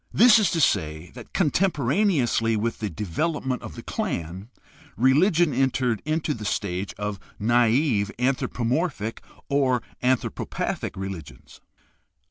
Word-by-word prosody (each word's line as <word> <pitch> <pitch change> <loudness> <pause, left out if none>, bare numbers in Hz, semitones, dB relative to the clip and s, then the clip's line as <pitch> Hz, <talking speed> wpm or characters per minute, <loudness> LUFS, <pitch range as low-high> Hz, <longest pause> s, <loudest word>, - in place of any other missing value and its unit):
This 235 0 +7
is 210 - +3
to 165 - 0
say 80 - 0
that, 120 -2 -12
con 160 -7 +1
temporaneously 145 - +1
with 115 +2 -2
the 105 - -2
development 125 - -2
of - - -9
the - - -9
clan, 90 +6 -4 0.5
religion 155 - +4
entered 125 -3 +1
into 155 0 0
the 110 - -8
stage 100 -2 -2
of 105 -1 -4 0.2
naive 115 0 +2
anthropomorphic 125 - -1 0.3
or 130 -4 +1 0.2
anthropo 130 0 0
pathic - - -3
religions. 95 -5 -8
125 Hz, 120 wpm, -25 LUFS, 105-150 Hz, 0.5 s, This